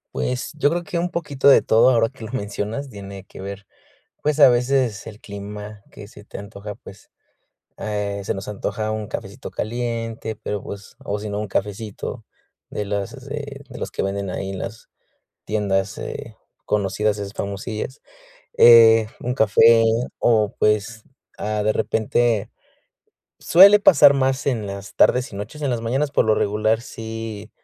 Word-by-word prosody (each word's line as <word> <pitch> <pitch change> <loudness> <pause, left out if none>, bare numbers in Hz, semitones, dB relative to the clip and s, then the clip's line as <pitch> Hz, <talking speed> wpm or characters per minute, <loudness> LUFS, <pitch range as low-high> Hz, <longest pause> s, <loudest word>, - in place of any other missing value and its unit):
Pues 125 0 -2
yo 145 - +3
creo 175 +2 -2
que 170 +1 -3
un 175 +1 -1
poquito 150 -6 -1
de 140 - +8
todo, 115 +3 +4
ahora 115 -3 +3
que 130 -4 -11
lo 115 - -9
mencionas, 105 +4 -4
tiene 100 -3 -9
que - - -14
ver, 100 +1 -7 0.6
pues, 150 0 0
a 145 - +9
veces 125 -2 +1
el 110 -2 -10
clima, 105 0 -8
que 100 - -11
se 105 - -14
te - - -10
antoja, 100 0 -8
pues, - - -15 0.7
eh, 105 -1 -3
se - - -1
nos 95 - -7
antoja 105 +1 -3
un 110 -1 -3
cafecito 100 +7 -7
caliente, 115 -1 -3
pero, 105 0 -4
pues 100 +1 -10
o 105 0 -3
si 105 0 -5
no 100 - -3
un 105 - -3
cafecito 105 +2 -4 0.4
de 105 - -4
los, 100 +2 -3 0.2
de 140 -1 -6
de - - -10
los - - -5
que - - -2
venden 100 0 -2
ahí 95 +1 -4
en 95 - -5
las 110 +4 -7 0.6
tiendas, 100 -1 -1
eh, - - -7 0.3
conocidas, 105 +1 0
esas 100 0 -6
famosillas, 105 +6 -5 0.5
eh, 115 -2 +8
un 125 +1 -2
café 115 0 +5 0.4
o, 110 -3 +2
pues, 105 +1 +1 0.4
ah, 105 0 -1
de 110 +1 +2
repente. 110 0 0 0.9
Suele 200 +4 +8
pasar 145 -6 +7
más 135 0 0
en 115 -6 0
las 100 +1 -8
tardes 125 +2 +3
y 100 - -7
noches; 105 +9 -7
en 145 - -1
las 120 -2 -1
mañanas, 135 +6 0
por - - +3
lo 110 -1 +3
regular, 110 +2 +1
sí, 110 -3 -7
110 Hz, 165 wpm, -22 LUFS, 100-120 Hz, 0.9 s, a